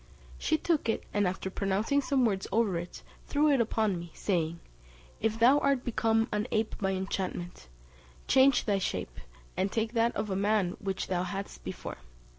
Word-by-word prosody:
She 315 - +1
took 310 -7 0
it, 225 - 0
and 205 -2 +2
after 190 +1 -3
pronouncing 205 +9 +1
some 265 -2 +2
words 195 -4 0
over 220 -5 +2
it, 175 - -8 0.2
threw 300 +1 +3
it 270 -4 +4
upon 215 -4 0
me, 170 0 -8
saying, 170 -4 -1 0.6
"If 220 0 0
thou 250 +5 +6
art 275 -3 +1
become 225 -1 +2
an 210 +2 -1
ape 220 0 0
by 195 -1 0
enchantment, 185 - -4 0.6
change 265 0 +5
thy 200 -2 +2
shape, - - -3 0.4
and 190 +1 0
take 225 0 -1
that 230 0 +2
of 210 - -2
a - - 0
man 200 -2 +2
which 195 -1 -3
thou 180 -1 -1
hadst 195 +2 -5
before." - - -6
210 Hz, 175 wpm, -30 LUFS, 190-235 Hz, 0.6 s, thou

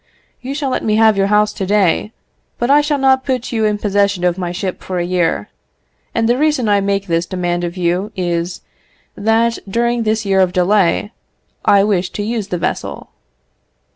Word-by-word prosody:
You 265 +2 -5
shall 280 -3 -2
let - - -1
me 215 -1 +1
have 220 -1 +5
your 195 0 +2
house 210 +1 +2
to - - -4
day, 205 0 +2 0.5
but 240 +3 0
I 290 +1 +6
shall 295 0 0
not 265 -1 +3
put 255 -3 -2
you 220 -2 0
in 210 -1 +1
possession 200 -3 0
of 175 -1 +2
my 175 -2 -4
ship 185 +1 -4
for 185 - -4
a 175 - -1
year; 175 - 0 0.7
and 225 0 +1
the 240 +2 +2
reason 300 -6 +1
I 205 -1 +3
make 200 0 -1
this 170 -1 -1
demand 175 -2 -2
of 175 +1 -4
you 180 +4 -1
is, 175 -1 -2 0.5
that, 225 +2 +1
during 235 +3 0
this 220 -1 0
year 195 -1 +2
of 185 -1 +2
delay, 190 +2 +2 0.5
I 200 -1 +5
wish 190 -3 0
to 205 - -3
use 220 -2 -3
the 180 - -2
vessel." - - -4
205 Hz, 195 wpm, -17 LUFS, 180-230 Hz, 0.7 s, I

